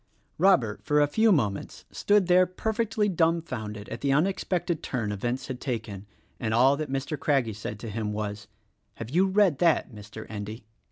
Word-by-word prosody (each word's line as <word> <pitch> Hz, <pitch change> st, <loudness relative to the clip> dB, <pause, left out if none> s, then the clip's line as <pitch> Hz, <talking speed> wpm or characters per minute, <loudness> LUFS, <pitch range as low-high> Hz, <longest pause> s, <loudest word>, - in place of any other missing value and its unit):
Robert, 135 Hz, -, +3 dB
for 150 Hz, 0 st, +2 dB
a 145 Hz, -, +5 dB
few 220 Hz, +9 st, +3 dB
moments, 105 Hz, -, -1 dB
stood 205 Hz, -2 st, +2 dB
there 180 Hz, +1 st, +5 dB
perfectly 220 Hz, +2 st, -1 dB
dumbfounded 160 Hz, -, -1 dB
at 115 Hz, -, -6 dB
the 140 Hz, -, +1 dB
unexpected 175 Hz, +1 st, 0 dB
turn 115 Hz, -5 st, -3 dB
events 120 Hz, +6 st, -3 dB
had 130 Hz, -1 st, -6 dB
taken, 110 Hz, -6 st, -4 dB, 0.3 s
and 110 Hz, -1 st, -1 dB
all 130 Hz, +4 st, +5 dB
that 150 Hz, 0 st, -4 dB
Mr. 135 Hz, +3 st, -3 dB
Craggie 135 Hz, -7 st, +1 dB
said 105 Hz, 0 st, -6 dB
to 115 Hz, -, -6 dB
him 105 Hz, 0 st, -3 dB
was, 105 Hz, -1 st, -4 dB, 0.5 s
"Have 115 Hz, +1 st, -7 dB
you 185 Hz, +5 st, +3 dB
read 190 Hz, -6 st, +3 dB
that, 165 Hz, -7 st, +2 dB
Mr. 105 Hz, +1 st, -10 dB
Endy?" 110 Hz, +1 st, -7 dB
135 Hz, 170 wpm, -27 LUFS, 110-175 Hz, 0.5 s, a